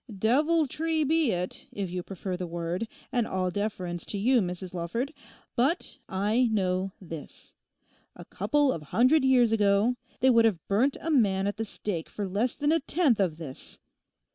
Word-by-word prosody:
Deviltry 310 - +2
be 315 -1 +2
it, 180 0 -4
if 195 -3 -4
you 180 0 -3
prefer 190 0 -5
the 180 0 -4
word, 170 +5 -3 0.2
and 240 -3 +1
all 185 -1 -1
deference 180 -4 -3
to 205 - -4
you, 245 +5 +3
Mrs 180 0 -4
Lawford. 210 - -3 0.4
But 275 +9 0
I 210 +6 +2
know 190 -2 0
this—a 165 -5 -13
couple 290 -2 +1
of 165 - -4
hundred 255 - +3
years 250 -4 +4
ago 210 +2 +3 0.2
they 260 +1 +5
would 230 -1 +5
have 190 -8 0
burnt 240 +8 +2
a 325 - -2
man 200 -9 +3
at 205 +1 -2
the 225 - -2
stake 195 -5 -4
for 205 -2 -4
less 210 +6 0
than 295 +1 +1
a 330 - +4
tenth 295 - +2
of 175 -6 +1
this. 150 -6 -8
210 Hz, 165 wpm, -28 LUFS, 185-260 Hz, 0.4 s, they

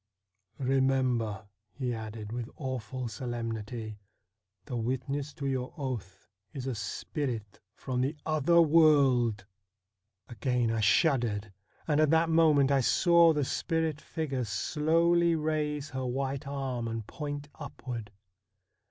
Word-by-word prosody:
' 100 -3 -52
Remember,' 130 -5 +1 0.3
he 125 -1 -3
added 110 -1 -6
with 120 0 -4
awful 130 -2 -4
solemnity, 115 -2 -5 0.3
' 100 -1 -52
the 130 - -5
witness 130 +5 -2
to 145 -4 -5
your 130 -2 -2
oath 110 - -5 0.3
is 135 -3 -5
a 135 - -1
spirit 110 +1 -4 0.2
from 125 -2 -2
the 135 +4 0
other 155 +2 +3
world! 140 -10 +4 0.4
' 100 -1 -57
Again 125 -1 0
I 115 - 0
shuddered, 110 - +2 0.3
and 150 -2 +2
at 155 -1 +4
that 165 +1 +3
moment 150 -4 +5
I 135 -1 +4
saw 170 +5 +5
the 150 -3 0
spirit 160 0 -1
figure 140 -6 -3
slowly 165 - +2
raise 150 -1 -1
her 130 -1 -3
white 135 +2 -2
arm 135 -4 -3
and 115 -1 -4
point 145 +2 -5
upward. 125 -7 -6
130 Hz, 130 wpm, -30 LUFS, 115-150 Hz, 0.4 s, moment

